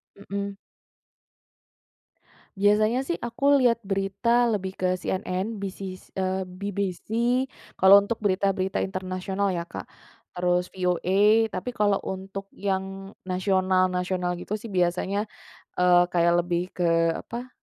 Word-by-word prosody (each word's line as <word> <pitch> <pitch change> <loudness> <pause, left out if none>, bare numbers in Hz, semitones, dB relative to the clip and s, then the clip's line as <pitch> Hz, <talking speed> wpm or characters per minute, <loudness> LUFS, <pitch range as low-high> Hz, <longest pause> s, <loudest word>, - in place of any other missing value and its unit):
Mhm. 200 0 -5 2.0
Biasanya 215 +6 +3
sih 345 - -2
aku 275 +4 +2
lihat 235 -2 +4
berita 200 +5 +1
lebih 190 -3 -2
ke 185 - -1
CNN, 190 +3 -3
BC 195 -1 -5 0.4
eee, 190 0 0
BBC, 195 -1 -4 0.7
kalau 195 +2 +8
untuk 220 +3 -3
berita-berita 190 -1 +1
internasional, 190 +1 -2
ya, 170 0 -3
Kak, - - -7 0.5
terus 180 0 0
VOA. 195 +4 +3
Tapi 185 +7 -3
kalau 205 -1 +2
untuk 195 +1 -6
yang 195 0 -3 0.2
nasional-nasional 185 -1 +1
gitu 210 - -3
sih 220 0 -9
biasanya, 185 +3 0 0.5
eee, 180 -1 +5
kayak 170 0 +4
lebih 175 0 -1
ke, 175 -1 0 0.3
apa, 245 +2 -7
195 Hz, 110 wpm, -26 LUFS, 185-205 Hz, 2.0 s, kalau